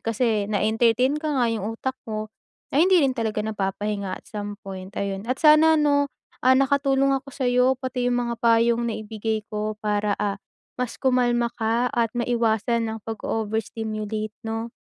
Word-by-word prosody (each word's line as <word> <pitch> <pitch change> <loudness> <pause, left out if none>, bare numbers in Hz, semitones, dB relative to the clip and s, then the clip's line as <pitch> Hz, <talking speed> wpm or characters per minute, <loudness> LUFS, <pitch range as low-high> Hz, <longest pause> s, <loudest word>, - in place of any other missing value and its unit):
kasi 225 -2 0
na-entertain 230 +6 +2
ka 310 - -2
nga, - - +4
yung 220 +1 -3
utak 260 +2 -3
mo 215 0 -4 0.4
ay 300 - +5
hindi 375 -2 +6
rin 270 -4 +2
talaga 220 -3 -1
napapahinga 200 -1 -2
at - - -21
some 205 -1 -6
point, 190 -1 -7
ayon. 195 -1 -2
At 260 - 0
sana 315 0 +6
'no, 285 -2 +2 0.3
ah, 255 - +6
nakatulong 275 0 +2
ako 275 +1 -4
sa'yo 250 -2 +2 0.2
pati 255 -1 -2
yung 245 - +1
mga 235 - -1
payong 235 0 +3
naibigay 220 0 -3
ko 215 0 -3
para, 210 -1 0
ah, 205 -1 0 0.4
mas 250 -2 -3
kumalma 245 -2 +2
ka 230 +2 +1
at 230 -2 +1
maiwasan 235 -1 0
ang 220 - -5
pag-o-overstimulate 220 -1 -3
'no. 225 +1 -3
225 Hz, 160 wpm, -24 LUFS, 215-250 Hz, 0.4 s, hindi